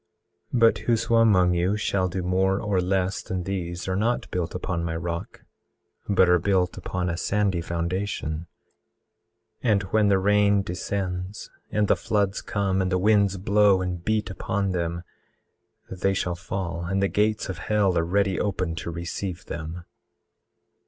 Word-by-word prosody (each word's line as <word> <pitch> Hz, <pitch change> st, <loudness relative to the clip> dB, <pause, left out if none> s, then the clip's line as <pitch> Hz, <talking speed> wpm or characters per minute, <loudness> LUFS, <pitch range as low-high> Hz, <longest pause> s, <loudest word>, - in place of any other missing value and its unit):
18:13 125 Hz, -, +1 dB
But 115 Hz, 0 st, +5 dB
whoso 115 Hz, 0 st, +1 dB
among 95 Hz, -6 st, +5 dB
you 90 Hz, +4 st, +1 dB
shall 100 Hz, -3 st, 0 dB
do 90 Hz, +1 st, -3 dB
more 95 Hz, +2 st, +1 dB
or 100 Hz, -4 st, 0 dB
less 95 Hz, 0 st, 0 dB
than 95 Hz, -1 st, -4 dB
these 85 Hz, -2 st, -4 dB
are 95 Hz, -, 0 dB
not 115 Hz, +5 st, 0 dB
built 90 Hz, -1 st, -2 dB
upon 90 Hz, -2 st, -2 dB
my 80 Hz, -1 st, -2 dB
rock, 85 Hz, 0 st, -5 dB, 0.7 s
but 95 Hz, -2 st, +5 dB
are 90 Hz, 0 st, +5 dB
built 90 Hz, -1 st, +1 dB
upon 90 Hz, -1 st, -3 dB
a 85 Hz, -, -1 dB
sandy 100 Hz, 0 st, 0 dB
foundation; 85 Hz, -1 st, -3 dB, 1.1 s
and 105 Hz, -4 st, +2 dB
when 110 Hz, -1 st, +4 dB
the 100 Hz, -1 st, +4 dB
rain 100 Hz, +1 st, +3 dB
descends, 90 Hz, +1 st, -4 dB, 0.2 s
and 105 Hz, -1 st, +1 dB
the -, -, +4 dB
floods 100 Hz, -1 st, 0 dB
come, 95 Hz, -2 st, 0 dB
and 95 Hz, 0 st, -1 dB
the 90 Hz, -, +2 dB
winds 100 Hz, 0 st, +3 dB
blow, 100 Hz, 0 st, +4 dB
and 90 Hz, -2 st, -4 dB
beat 110 Hz, -1 st, 0 dB
upon 100 Hz, 0 st, -2 dB
them, 85 Hz, -1 st, -2 dB, 0.9 s
they 95 Hz, +1 st, 0 dB
shall 90 Hz, -2 st, -1 dB
fall, 85 Hz, -2 st, -4 dB
and 95 Hz, +3 st, -1 dB
the 100 Hz, -, +3 dB
gates 105 Hz, +2 st, +1 dB
of 95 Hz, -2 st, -5 dB
hell 105 Hz, -4 st, +1 dB
are 85 Hz, -, +2 dB
ready 95 Hz, +2 st, +1 dB
open 90 Hz, -4 st, -1 dB
to 85 Hz, -, -4 dB
receive 85 Hz, +2 st, -5 dB
them. 85 Hz, +2 st, -6 dB
95 Hz, 160 wpm, -25 LUFS, 90-100 Hz, 1.1 s, But